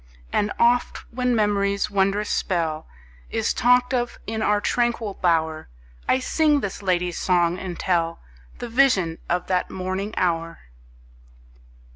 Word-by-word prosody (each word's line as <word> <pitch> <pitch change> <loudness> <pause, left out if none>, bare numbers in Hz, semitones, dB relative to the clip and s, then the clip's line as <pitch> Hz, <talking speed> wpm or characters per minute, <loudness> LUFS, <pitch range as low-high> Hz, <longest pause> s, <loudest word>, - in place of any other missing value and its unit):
And 205 0 +1
oft 240 +1 +2
when 250 0 +1
memory's 200 -1 +1
wondrous 200 +1 +1
spell 160 -4 -1 0.4
Is 225 -1 0
talked 250 +1 +3
of 245 -1 -1
in 220 0 -3
our 210 -1 +2
tranquil 235 -2 0
bower, 160 - 0 0.4
I - - +5
sing 295 +2 +2
this 200 0 -4
lady's 180 -2 0
song, 175 -1 +2
and 180 -3 -6
tell 165 -3 0 0.4
The 240 - -6
vision 225 -10 +2
of 180 +1 0
that 180 -1 0
morning 190 +3 -4
hour. 165 -2 0
200 Hz, 130 wpm, -23 LUFS, 175-235 Hz, 0.4 s, I